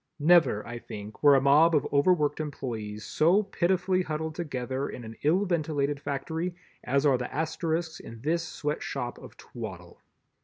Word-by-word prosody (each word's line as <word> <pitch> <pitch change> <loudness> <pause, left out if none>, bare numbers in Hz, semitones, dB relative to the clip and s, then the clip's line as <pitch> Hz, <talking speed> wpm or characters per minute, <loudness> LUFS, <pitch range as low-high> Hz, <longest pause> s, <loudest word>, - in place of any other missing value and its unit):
Never, 155 -9 +4
I 120 0 -6
think, 105 -1 -9
were 145 -1 +7
a 135 - +4
mob 150 +4 +5
of 145 - +2
overworked 150 0 +3
employees 110 -8 -5
so 175 - +3
pitifully 185 -1 +1
huddled 160 -2 -3
together 135 -4 -3
in 125 - -7
an 110 0 -9
ill 175 +7 +3
ventilated 150 -5 0
factory 160 +5 -3 0.3
as 140 +3 +1
are 135 -4 +4
the 125 - -4
Asterisks 160 +2 -2
in 115 -1 -10
this 165 +5 0
Sweatshop 145 -5 -4
of - - -13
Twaddle. - - -9
150 Hz, 155 wpm, -28 LUFS, 130-165 Hz, 0.3 s, were